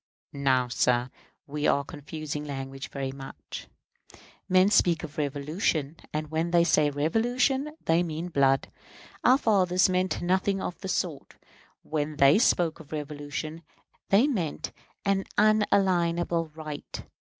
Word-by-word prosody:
Now, 130 -3 +2
sir, 125 0 +1 0.3
we 150 +1 -2
are 140 - +3
confusing 150 +1 -6
language 135 -1 -6
very 135 -1 -4
much. 135 0 -9 0.8
Men 185 +2 +5
speak 170 -5 +3
of 155 -1 -7
revolution; 150 +1 -1 0.2
and 155 0 -4
when 160 +2 0
they 170 -1 +4
say 155 -3 +3
revolution 245 - 0
they 165 +1 +3
mean 165 0 -3
blood. 135 -4 +2 0.5
Our 255 - +6
fathers 185 -7 +3
meant 185 0 0
nothing 190 +2 +1
of 180 - -4
the 195 - -6
sort. 170 -6 -3 0.5
When 155 -1 -2
they 140 +6 +6
spoke 175 -9 +2
of 155 -3 -14
revolution 150 +1 -5 0.5
they 205 +6 +5
meant 165 - -2 0.3
an 195 -1 +1
unalienable 175 -5 +2
right. 155 -2 -7
160 Hz, 130 wpm, -27 LUFS, 145-185 Hz, 0.8 s, Our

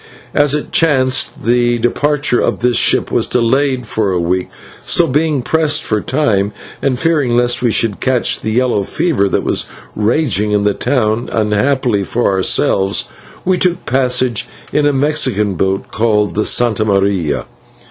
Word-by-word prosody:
As 145 0 +2
it 150 - -4
chanced, 130 -5 +1
the 120 0 +2
departure 145 +3 +1
of - - -1
this 125 0 +1
ship - - +2
was - - +1
delayed 130 +2 0
for 105 -2 -1
a 90 - 0
week, 90 +2 -1 0.3
so, 175 - +3
being 150 -2 0
pressed 155 +1 +1
for 105 -1 -1
time 105 -8 0 0.3
and 130 -2 0
fearing 145 -5 +1
lest 120 0 +1
we 125 - +2
should 110 -2 0
catch 130 -2 +1
the 110 - -4
yellow 120 -1 +1
fever 100 - 0
that - - -1
was - - 0 0.3
raging 105 -2 0
in 105 -1 +1
the 105 0 +2
town, 120 -3 -1
unhappily 110 +1 0
for 120 +2 0
ourselves 95 +1 +1 0.4
we 185 -1 +1
took 180 0 -1
passage 125 -2 0 0.3
in 150 -1 +2
a - - +3
Mexican 130 -8 0
boat 95 +2 -2
called 105 -2 +1
the 105 - +1
/Santa 115 -3 +1
Maria 100 -6 0
120 Hz, 160 wpm, -15 LUFS, 105-140 Hz, 0.4 s, so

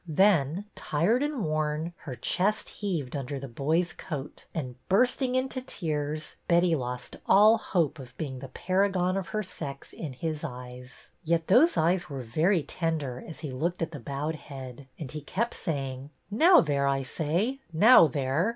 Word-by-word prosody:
Then, 170 0 +3
tired 180 - +1
and 290 - -1
worn, 155 +2 -1
her 135 -5 -5
chest 195 - 0
heaved 170 -11 -3
under 140 0 -4
the 135 - -6
boy's 155 +8 0
coat, 145 -3 -7
and, 130 -6 -4 0.2
bursting 250 +5 +2
into 255 0 -1
tears, 155 - -3
Betty 170 -1 +4
lost 125 -3 -5
all 215 +3 +7
hope 165 -9 0
of 125 -1 -11
being 135 -5 -4
the 135 - -7
Paragon 185 +4 +1
of 195 -1 -2
her 215 0 -2
sex 140 -7 -7
in 155 -6 -6
his 155 +3 -4
eyes. 125 -2 -9
Yet 165 0 +1
those 285 - +5
eyes 175 +2 +2
were 135 -3 -5
very 160 - +2
tender 150 -8 -2
as 160 - -9
he 150 - -5
looked 165 +7 -1
at 165 - -4
the 145 - -7
bowed 145 +2 -3
head, 135 -2 -9
and 140 -5 -6
he 155 - -5
kept 230 +11 -2
saying. 135 -5 -4 0.2
Now 340 - +7
there, 140 -3 +1
I 135 0 +1
say, 175 - -1
now 205 +3 +8
there!" 140 - 0
155 Hz, 170 wpm, -28 LUFS, 140-185 Hz, 0.2 s, now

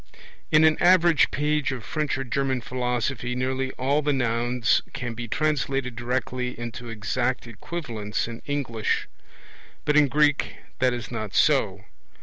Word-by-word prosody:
In 155 +1 +6
an 160 0 +4
average 175 -4 +5
page 150 -1 0
of 125 -4 -5
French 155 -5 -1
or 135 - -2
German 130 0 -1
philosophy 125 0 -2
nearly 130 +1 -1
all 140 +4 +1
the 150 0 +1
nouns 120 -2 +1
can 125 -3 -4
be 120 +1 -6
translated 135 -3 0
directly 125 +1 -2
into 120 0 -6
exact 120 +4 -1
equivalents 115 -3 -4
in 115 0 -8
English; 130 -6 -1 0.8
but 150 - +2
in 150 -1 +6
Greek 145 +1 +2 0.2
that 130 0 +3
is 120 -2 -5
not 110 -4 -4
so. 100 -10 +2
125 Hz, 140 wpm, -25 LUFS, 120-145 Hz, 0.8 s, In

